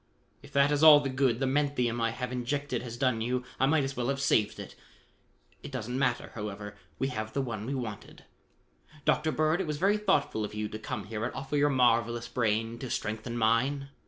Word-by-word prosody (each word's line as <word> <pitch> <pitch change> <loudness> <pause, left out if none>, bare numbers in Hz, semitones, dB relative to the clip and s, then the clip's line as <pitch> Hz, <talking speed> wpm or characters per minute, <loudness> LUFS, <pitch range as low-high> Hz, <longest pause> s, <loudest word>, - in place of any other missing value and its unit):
"If 145 - -15
that 140 +1 +4
is 145 0 +1
all 155 -2 +10
the 140 -2 -2
good 130 -3 +1
the 135 - +1
menthium 130 -4 0
I 115 - +2
have 125 +2 -4
injected 125 +1 -2
has 120 -1 -7
done 125 -3 +1
you, 125 +2 -1 0.2
I 135 - +4
might 150 0 +3
as 135 0 -3
well 120 0 -2
have 140 0 -1
saved 115 -6 +2
it. - - -8 0.9
It - - -9
doesn't 125 -2 -4
matter, 125 -3 0
however: 105 -1 -6 0.2
we 135 - -1
have 110 -3 -5
the 140 - 0
one 110 -3 -5
we 140 - -2
wanted. 110 -5 -7 0.8
Dr. 155 +1 +2
Bird, 155 +4 +1
it 185 - -3
was 150 -1 -2
very 200 +6 +3
thoughtful 150 - +1
of 105 - -5
you 105 0 -2
to 110 - -6
come 110 -1 -4
here 110 +1 -5
and 120 - -1
offer 135 +2 -4
your 145 0 +4
marvelous 120 -3 +2
brain 115 0 -1
to 130 - -6
strengthen 110 +2 -3
mine. 130 +5 +1
125 Hz, 215 wpm, -29 LUFS, 115-140 Hz, 0.9 s, all